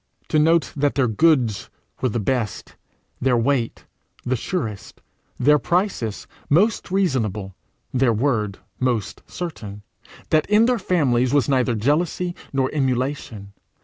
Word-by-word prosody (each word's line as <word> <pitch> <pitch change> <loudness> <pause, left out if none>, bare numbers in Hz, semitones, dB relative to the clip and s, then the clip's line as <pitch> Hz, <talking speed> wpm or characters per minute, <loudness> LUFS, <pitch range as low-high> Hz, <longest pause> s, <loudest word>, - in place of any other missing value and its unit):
to 155 - +2
note 160 -1 +3
that 145 0 +1
their 135 -3 +2
goods 120 -3 +2 0.3
were 130 - +1
the 120 - -2
best, 110 -1 -2 0.5
their 125 -1 +3
weight 120 -1 0 0.5
surest, 115 - -4 0.4
their 150 +4 +5
prices 175 - -1 0.2
most 200 +11 +2
reasonable, 115 - -1 0.4
their 130 -2 +3
word 110 -4 0 0.2
most 120 -5 -1
certain! 105 - -7 0.5
that 155 +2 +2
in 210 +2 +5
their 245 -1 +1
families 130 -7 +1
was 140 -6 +3
neither 130 -3 +2
jealousy 155 +9 0 0.2
nor 135 -1 0
emulation! 130 -7 -2
130 Hz, 120 wpm, -22 LUFS, 115-155 Hz, 0.5 s, their